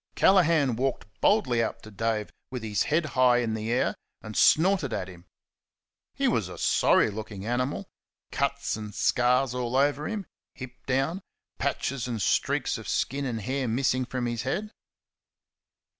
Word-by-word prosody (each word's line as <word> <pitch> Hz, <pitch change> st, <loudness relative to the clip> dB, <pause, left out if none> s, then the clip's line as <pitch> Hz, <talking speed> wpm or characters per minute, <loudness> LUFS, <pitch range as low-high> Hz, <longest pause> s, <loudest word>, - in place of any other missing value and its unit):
Callaghan 165 Hz, -, +4 dB
walked 135 Hz, +1 st, -1 dB, 0.2 s
boldly 130 Hz, -, +3 dB
up 115 Hz, -, -3 dB
to 110 Hz, -, -11 dB
Dave, 110 Hz, 0 st, -2 dB, 0.2 s
with 125 Hz, -3 st, -6 dB
his 105 Hz, -2 st, -1 dB
head 155 Hz, +2 st, +2 dB
high 125 Hz, -1 st, +5 dB
in 115 Hz, -2 st, 0 dB
the 110 Hz, +1 st, -3 dB
air, 125 Hz, -, +1 dB, 0.3 s
and 110 Hz, 0 st, -8 dB
snorted 165 Hz, -, +4 dB
at 95 Hz, -, -3 dB
him. 90 Hz, -2 st, -13 dB, 0.9 s
He -, -, +1 dB
was -, -, 0 dB
a -, -, -9 dB
sorry -, -, +3 dB
looking 105 Hz, -1 st, -7 dB
animal 120 Hz, -2 st, -2 dB, 0.4 s
cuts -, -, -1 dB
and 105 Hz, -2 st, -7 dB
scars 125 Hz, +1 st, +2 dB
all 125 Hz, -1 st, -2 dB
over 145 Hz, +2 st, +2 dB
him; 210 Hz, -3 st, -4 dB, 0.3 s
hip 130 Hz, -1 st, -10 dB
down; 135 Hz, +8 st, 0 dB, 0.4 s
patches 130 Hz, -2 st, -1 dB
and 115 Hz, -3 st, -3 dB
streaks 95 Hz, -, +1 dB
of -, -, -8 dB
skin 140 Hz, +2 st, -1 dB
and 115 Hz, -4 st, -3 dB
hair 130 Hz, +3 st, -2 dB
missing 130 Hz, +2 st, +1 dB
from 125 Hz, 0 st, -3 dB
his 120 Hz, -1 st, -2 dB
head. 195 Hz, -, -3 dB
125 Hz, 160 wpm, -27 LUFS, 115-140 Hz, 0.9 s, high